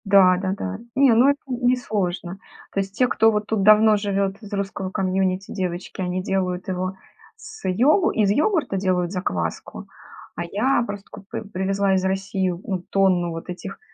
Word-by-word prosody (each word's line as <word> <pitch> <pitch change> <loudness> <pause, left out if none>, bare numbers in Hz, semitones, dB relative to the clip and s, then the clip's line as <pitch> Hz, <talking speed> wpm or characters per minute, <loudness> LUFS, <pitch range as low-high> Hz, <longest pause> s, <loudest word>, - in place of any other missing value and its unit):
Да-да-да. 190 - +3 0.2
Не, 270 -2 +5
ну 245 +5 +5
это 285 0 +1
не 250 -1 +1
сложно. 190 -6 -3 0.3
То - - 0
есть 195 0 -3
те, 250 - +4
кто 225 -2 +3
вот 210 -1 -1
тут 220 -3 0
давно 215 +1 +6
живет 200 0 -1
из 210 -1 -11
русского 195 -1 -3
комьюнити 190 0 -1
девочки, 185 -1 -4
они 185 0 -2
делают 185 -1 -2
его 185 0 -2 0.4
с 350 - -9
йогу 270 - +3
из 210 -3 +2
йогурта 295 - +1
делают 180 -2 0
закваску, 90 - -4 0.5
а 175 - -3
я 235 +8 +1
просто 205 -1 -7
купи 200 - -8
привезла 195 -1 0
из 185 - 0
России 190 0 -1
ну 180 +1 -4
тонну 185 -3 +2
вот 165 +2 -7
этих 190 +2 -7
195 Hz, 165 wpm, -23 LUFS, 185-215 Hz, 0.5 s, давно